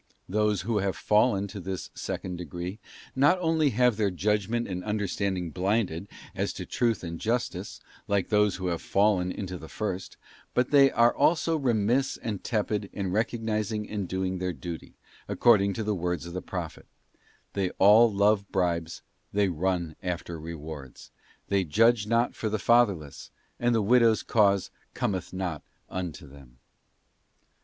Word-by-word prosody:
Those 105 0 +1
who 105 +2 0
have 100 -1 -1
fallen 105 -2 +2
to 100 +1 -7
this 95 -1 -5
second 90 -1 -5
degree, 90 +4 -6 0.4
not 145 +7 +4
only 160 -3 +2
have 125 -2 +2
their 105 -2 +2
judgment 105 +5 0
and 90 -1 -4
understanding 100 -4 -2
blinded 95 -1 -1 0.3
as - - -2
to - - -6
truth 115 -5 0
and 85 -1 -5
justice, 110 -5 -2 0.3
like 100 -2 0
those 105 -3 +3
who 95 - -5
have 85 -2 -1
fallen 100 -3 +2
into 95 -3 -5
the 80 - -10
first; 95 -3 -4 0.4
but 125 +2 +1
they 140 -2 +7
are 120 -1 +4
also 165 0 +2
remiss 125 -1 +1
and 105 -5 -5
tepid 105 -2 -1
in 95 -3 -3
recognising 110 -1 -1
and 100 -3 -3
doing 95 0 -2
their 90 0 -2
duty, 80 +1 -8 0.3
according 100 -4 +4
to 110 - -3
the 105 0 0
words 90 -3 -2
of 85 - -8
the 90 - -3
Prophet: 85 -4 -6 0.7
'They 95 -2 0
all 110 +4 +7
love 100 0 +2
bribes, 85 -3 -1 0.3
they 100 -1 +2
run 85 -1 -1
after 85 -2 -4
rewards. 75 -4 -9 0.4
They 100 -1 +2
judge 110 +6 +3
not 115 +2 +2
for 110 - -3
the 110 - 0
fatherless; 100 - +1 0.3
and 120 0 +2
the 110 - +2
widow's 115 0 +4
cause 100 -4 +2 0.2
cometh 95 -4 -2
not 90 -5 -3 0.3
unto 90 -3 -5
them. 65 -3 -16
100 Hz, 155 wpm, -27 LUFS, 90-110 Hz, 0.7 s, they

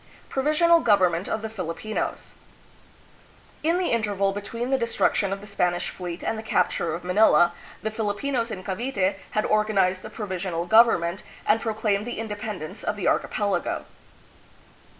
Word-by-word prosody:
Provisional 310 +5 +4
Government 190 - +2
of 220 - -2
the - - -2
Filipinos. 185 +5 -4 1.3
In 330 +3 +2
the 365 -1 0
interval 205 -4 +1
between 230 +5 -4
the 270 - +4
destruction 230 -3 +1
of 195 0 -3
the - - -10
Spanish 180 -3 -1
fleet 175 -1 -6
and 220 - -1
the - - -4
capture 180 -5 0
of 175 - -7
Manila, 180 -2 +5 0.3
the 220 - -1
Filipinos 230 +3 -1
in 190 -4 -6
Cavite 195 -1 -1 0.2
had 215 - +2
or 215 0 +3
ganized 190 -3 +1
a - - -7
provisional 185 -4 -3
government 190 -4 +4 0.2
and 225 - +3
proclaimed 215 -1 0
the 240 - -4
in 225 +1 -3
dependence 205 -6 -6
of - - -1
the 200 -4 -2
archipelago. 205 -2 0
205 Hz, 150 wpm, -25 LUFS, 185-225 Hz, 1.3 s, Manila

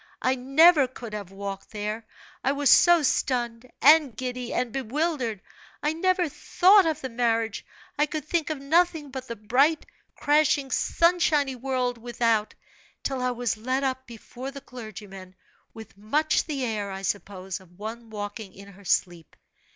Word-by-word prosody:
I 255 - +3
never 275 +3 +5
could 240 -3 -10
have 205 -3 -6
walked 195 0 -7
there, 215 +1 -5 0.4
I 270 - +2
was 285 -2 +3
so 345 -3 +6
stunned, 245 -3 -1
and 295 -6 +6
giddy, 250 -1 -4
and 250 -2 -1
bewildered. 260 - -2 0.4
I 300 +1 +1
never 365 +1 +1
thought 375 +5 +4
of 315 -3 -1
the 260 - -4
marriage 230 -2 0 0.4
I 300 - +3
could 305 0 -5
think 325 -1 -1
of 310 - -2
nothing 320 0 +1
but 260 -1 -7
the 235 - -5
bright, 260 +9 +2 0.3
crashing, 295 -2 +2
sun 340 +6 +2
shiny 285 -5 +2
world 250 -1 -2
without, 230 -2 0 0.5
till 270 -2 -2
I 250 - +1
was 245 -2 -2
led 255 +5 -1
up 260 -1 -2
before 240 +3 -8
the 275 0 -8
clergyman, 205 -7 -10 0.4
with 220 -2 -12
much 290 +10 0
the 280 -5 -3
air, 210 -3 -3
I 195 0 -6
suppose, 195 -2 -4
of 180 -2 -20
one 225 +2 -7
walking 205 -1 -6
in 200 +1 -12
her 200 0 -16
sleep. 175 -3 -1
250 Hz, 160 wpm, -26 LUFS, 215-290 Hz, 0.5 s, so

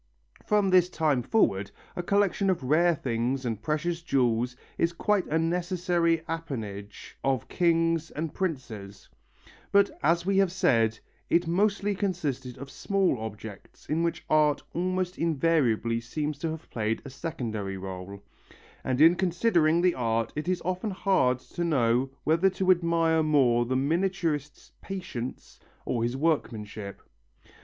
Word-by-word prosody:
From 205 -2 +2
this 180 -1 +5
time 155 -7 +1
forward 100 - +1 0.3
a - - -2
collection 200 +1 +1
of 180 -7 0
rare 165 +6 +3
things 125 0 -2
and 110 -3 -3
precious 165 +6 -1
jewels 125 -5 +1 0.2
is 170 0 +1
quite 205 +2 +1
a 160 - +1
necessary 170 0 +1
apanage 110 -12 -6
of 135 -4 0
kings 165 -2 +1
and 155 0 -4
princes, 115 - -5 0.6
but 200 0 +4
as 170 +3 +2
we 195 0 +1
have 195 -3 +3
said, 115 - +2 0.3
it 175 +1 +3
mostly 205 +4 +1
consisted 165 - -3
of 140 +1 -9
small 195 - 0
objects 110 -1 -9
in 155 +2 0
which 170 0 -2
art 150 -1 +3
almost 185 +1 -1
invariably 140 -8 +1
seems 145 +5 -4
to 165 - -2
have 160 0 -7
played 110 -1 -2
a - - -6
secondary 115 - -4
rôle, 95 +1 -7 0.6
and 130 +1 0
in 165 +2 +8
considering 175 -2 +2
the 180 -1 +4
art 115 -2 -1
it 150 +3 -4
is 185 -1 -1
often 185 +4 -1
hard 185 -10 +2
to 175 +6 -6
know 130 -5 +2
whether 165 +5 +3
to 190 0 +2
admire 170 -2 +2
more 130 -6 +3
the 130 - 0
miniaturist's 155 0 -1
patience 145 -11 -6 0.3
or 120 - -1
his 120 +3 -1
workmanship. 110 - -2
155 Hz, 140 wpm, -27 LUFS, 120-175 Hz, 0.6 s, in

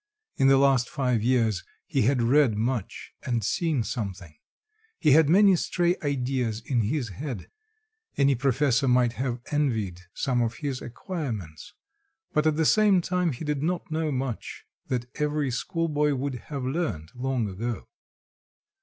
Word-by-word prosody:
In 135 - +4
the 135 0 +6
last 135 -3 +3
five 125 -6 0
years 115 -5 +1 0.2
he - - 0
had 125 +2 +2
read 125 -2 +4
much 115 -2 -3
and 120 -3 -1
seen 155 - 0
something; 95 - -5 0.6
he 150 - +3
had 150 +1 +6
many 195 +2 +6
stray 175 +1 +1
ideas 125 -5 -1
in 125 -4 +1
his 120 +3 -1
head; 130 - -6 0.7
any 140 0 +4
professor 135 +1 +2
might 125 -2 +3
have 125 -1 -3
envied 110 - 0
some 125 -3 0
of 115 -1 -1
his 140 -2 -4
acquirements, 120 - -6 0.6
but 150 +1 +2
at 155 - +2
the 160 +1 +1
same 210 +1 +5
time 180 -1 0
he 135 +4 -6
did 150 -2 -1
not 170 +1 -2
know 155 -1 0
much 130 -3 -4 0.2
that 125 -2 -1 0.2
every 150 -2 0
schoolboy 150 +1 0
would 135 +1 -2 0.2
have 140 -3 -4
learnt 130 - -3
long 125 -3 -1
ago. 110 +5 -4
135 Hz, 150 wpm, -26 LUFS, 120-150 Hz, 0.7 s, the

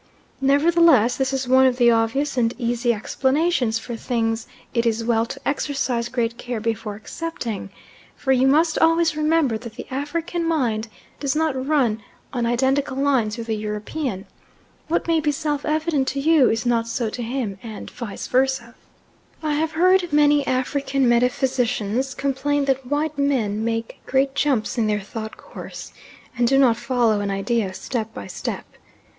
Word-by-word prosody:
Nevertheless 285 -3 +4
this 265 0 0
is 265 -1 -2
one 260 +1 +6
of 250 -1 0
the 240 -1 +5
obvious 230 +6 +1
and 235 -2 +1
easy 240 0 0
explanations 265 +2 +1
for 235 +1 -6
things 225 -1 -1 0.3
it 235 -1 +1
is 230 0 0
well 230 0 +1
to - - -7
exercise 270 -4 -1
great 235 -2 -2
care 245 -2 -4
before 225 -1 -3
accepting, 225 - -5 0.5
for 265 - -1
you 260 0 +4
must 315 +4 +3
always 330 -1 +3
remember 305 -6 +1
that 235 -1 -9
the - - -7
African's 330 +5 -2
mind 235 -9 0 0.3
does 280 0 -1
not 290 -4 0
run 250 -8 +2 0.3
on 240 -2 0
identical 265 +3 +1
lines 255 -6 +1
with 230 - -5
the 225 -1 -1
European 210 +1 -4 0.6
what 330 - 0
may 330 -1 +3
be 300 -1 +1
self 295 -1 -2
evident 305 -3 0
to 275 - -1
you 300 -2 +4
is 225 +1 -1
not 230 -1 +1
so 230 0 -1
to 245 - -5
him, 230 -5 -3
and 220 -2 -8
vice 235 -5 -6
versa. 255 -2 0 0.7
I 305 -1 0
have 310 +2 0
frequently 320 -4 +4
heard - - -8
African 270 +1 0
metaphysicians 245 0 +1
complain 280 +1 0
that 270 -2 0
white 295 +1 -1
men 225 -7 +1
make 225 0 -3
great 270 +1 +2
jumps 270 -5 0
in 220 - +2
their 210 -1 0
thought 220 +2 -7
course, - - -10 0.4
and 240 0 +2
do 270 +2 +3
not 250 -4 +4
follow 240 -3 +1
an 200 - -2
idea 195 +1 -1
step 225 -1 -4
by - - -6
step. - - -5
255 Hz, 165 wpm, -22 LUFS, 230-285 Hz, 0.7 s, one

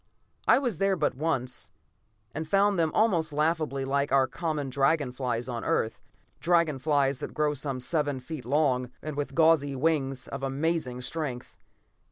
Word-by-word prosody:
I - - +7
was 245 - -1
there 195 0 +2
but 155 -4 0
once, 130 -4 -2 0.6
and 155 +1 -4
found 200 +2 +3
them 160 -2 +2
almost 175 -8 +2
laughably 150 -2 0
like 140 +1 0
our 135 -1 +5
common 150 -3 -3
dragon 140 0 +2
flies 125 -2 -2
on 120 -2 -4
Earth; 110 - 0 0.4
dragon 165 -4 +2
flies 140 -2 +1
that - - -6
grow 150 -1 +1
some 135 -2 -3
seven 145 +1 0
feet 135 +1 -7
long, 130 -2 +1
and 155 -1 -4
with 145 0 -3
gauzy 160 -4 +4
wings 135 -2 0
of 140 - -6
amazing 135 -2 -1
strength. 130 -2 -4
145 Hz, 160 wpm, -28 LUFS, 130-160 Hz, 0.6 s, I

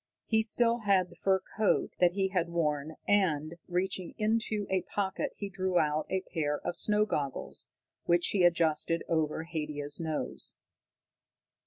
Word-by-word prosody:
He 220 -1 +3
still 230 +2 +2
had 195 -4 +2
the - - -14
fur 190 -1 +2 0.2
coat 215 -1 +2
that 175 -1 +4
he 190 0 +1
had 180 -3 0
worn, 155 -2 -1
and, 165 -5 +2
reaching 185 0 -2
into 215 -1 0
a 190 -1 +1
pocket 190 +2 -2
he 200 - -4
drew 185 -1 -1
out 155 -1 +1
a 190 0 0
pair 150 -5 -2
of - - -3
snow 210 0 +2
goggles, 140 -9 -3 0.4
which 175 0 +3
he 195 -3 +2
adjusted 165 -1 +2
over 160 -1 0
Haidia's 150 -3 -3
nose. 160 -2 -3
180 Hz, 150 wpm, -30 LUFS, 160-200 Hz, 0.4 s, that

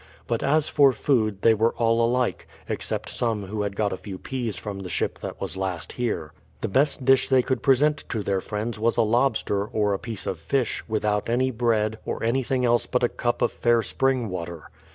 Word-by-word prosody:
But 115 - -1
as 155 +2 +2
for 140 -3 +5
food, 110 -5 0
they 115 - +6
were 110 +2 +1
all 115 0 +2
alike, 120 -8 0 0.2
except - - -3
some 110 -4 -1
who 105 +2 -3
had 100 -1 -2
got 105 -1 0
a - - -4
few 95 -1 -8
peas 120 -4 -4
from 100 +2 -6
the 95 -2 -6
ship - - -2
that - - -7
was - - -4
last 95 -3 -3
here. 105 -11 -3 0.3
The - - -1
best 135 +4 +1
dish 135 0 +4
they 130 -2 +4
could 130 -3 -1
present 145 +3 +3
to 110 -3 -2
their 95 -1 0
friends 105 +3 -4
was 115 +2 +1
a 115 - +5
lobster, 110 -3 +1
or 105 -1 0
a 95 - -2
piece 110 -3 -6
of 90 - -3
fish, 125 +10 -1
without 105 -1 0
any 130 +2 +2
bread, 110 -2 0
or - - -4
anything 125 +2 +1
else 120 0 +2
but 125 0 0
a 120 - +4
cup 120 -1 -1
of - - +2
fair 120 -1 +2
spring 130 -2 0
water. 85 -3 -6
115 Hz, 215 wpm, -25 LUFS, 105-125 Hz, 0.3 s, they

